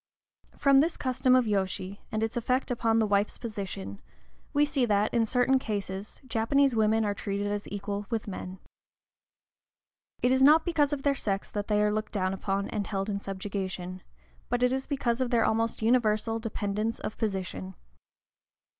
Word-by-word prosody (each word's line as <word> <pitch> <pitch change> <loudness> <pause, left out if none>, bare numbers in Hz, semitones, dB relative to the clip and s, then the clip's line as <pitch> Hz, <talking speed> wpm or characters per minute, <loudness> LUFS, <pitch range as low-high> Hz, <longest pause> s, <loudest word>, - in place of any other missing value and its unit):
From 275 -1 +5
this 320 +4 +2
custom 255 -1 +2
of 255 -1 +4
yōshi, 195 -1 -2
and 220 0 -1
its 225 0 -2
effect 250 +2 0
upon 225 -2 +1
the 225 - +3
wife's 205 0 +1
position, 190 - -6 0.5
we 290 +1 +3
see 285 -3 0
that, 210 -2 +2
in 230 -2 +2
certain 255 +3 +3
cases, 200 -3 -5
Japanese 260 +3 +2
women 220 0 +3
are 205 - 0
treated 200 0 -3
as 205 0 -2
equal 200 0 -4
with 225 -3 -2
men. 185 -1 -6 1.7
It 250 - +4
is 260 0 +3
not 305 +4 +7
because 310 -5 +2
of 280 -2 -3
their 285 - +3
sex 200 -7 -3
that 205 -1 -3
they 210 -1 +2
are 210 - +2
looked 215 +1 -3
down 190 -2 0
upon 195 +1 -2
and 205 -3 -3
held 195 0 -2
in 200 - -2
subjection, 190 -2 -5 0.5
but 245 +1 0
it 250 +1 +3
is 265 0 -2
because 255 -4 0
of 255 - +1
their 235 -2 +3
almost 225 0 0
universal 225 -1 +2
dependence 215 0 -2
of 215 - -6
position. 190 -2 -3
215 Hz, 170 wpm, -28 LUFS, 200-250 Hz, 1.7 s, not